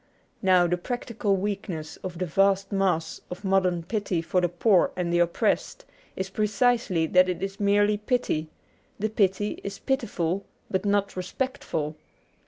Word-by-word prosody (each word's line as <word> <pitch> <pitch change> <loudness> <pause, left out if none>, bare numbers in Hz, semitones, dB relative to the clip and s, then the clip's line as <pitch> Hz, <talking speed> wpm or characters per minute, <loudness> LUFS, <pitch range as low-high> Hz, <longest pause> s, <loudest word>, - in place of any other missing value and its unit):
Now, 185 -3 +5
the 175 +1 +1
practical 225 -1 -1
weakness 190 -5 -4
of 180 -2 -7
the 185 - -1
vast 195 +3 +2
mass 180 -5 0
of 180 +3 -7
modern 185 -3 +2
pity 200 -2 -1
for 180 +2 +1
the 175 - +1
poor 180 +2 +3
and 175 -1 -1
the 175 - +3
oppressed 170 0 0 0.3
is 190 +1 -4
precisely 215 -4 +2
that 185 +3 +4
it 180 0 -3
is 195 0 -4
merely 205 +1 +3
pity; 210 - -1 0.5
the 215 +2 -1
pity 205 -1 0
is 200 0 -5
pitiful, 200 - -1 0.3
but 190 +1 0
not 200 0 +1
respectful. 185 - -3
195 Hz, 150 wpm, -26 LUFS, 175-205 Hz, 0.5 s, Now